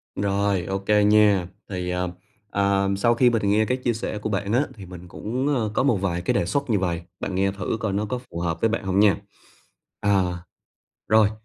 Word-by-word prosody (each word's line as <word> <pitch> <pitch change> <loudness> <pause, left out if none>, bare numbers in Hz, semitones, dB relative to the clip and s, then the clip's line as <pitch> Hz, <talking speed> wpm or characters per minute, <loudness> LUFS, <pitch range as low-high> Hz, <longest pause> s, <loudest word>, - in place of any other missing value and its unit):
Rồi, 100 -2 0
ô 95 +1 -2
kê 105 +1 +3
nha! 105 -3 +4 0.2
Thì, 90 -2 -3
à, 90 0 -1 0.4
ờm, 100 -1 +1
sau 115 +4 +3
khi 125 +1 +5
mình 110 -4 0
nghe 105 +2 +3
cái 125 +3 0
chia 125 -2 0
sẻ 110 -1 -4
của 105 +1 -4
bạn 100 0 -1
á, 125 - +4
thì 100 -4 -10
mình 90 -1 -10
cũng, 125 +9 -3
ơ, 110 -4 -1
có - - +1
một 135 -4 +3
vài 90 -3 -1
cái 90 - 0
đề - - +1
xuất 140 +9 -1
như 105 -4 +2
vầy, 85 -3 -1 0.2
bạn 95 - -3
nghe 95 +1 +2
thử 100 +2 -3
coi 110 -3 -2
nó 105 +2 0
có 125 +4 -3
phù 85 - -5
hợp 85 -1 -2
với 115 - +3
bạn 115 0 -2
hông 95 0 +1
nha. 105 -2 +5 0.8
À, 95 -3 +1 0.7
rồi, 110 0 +5
100 Hz, 225 wpm, -24 LUFS, 95-110 Hz, 0.8 s, khi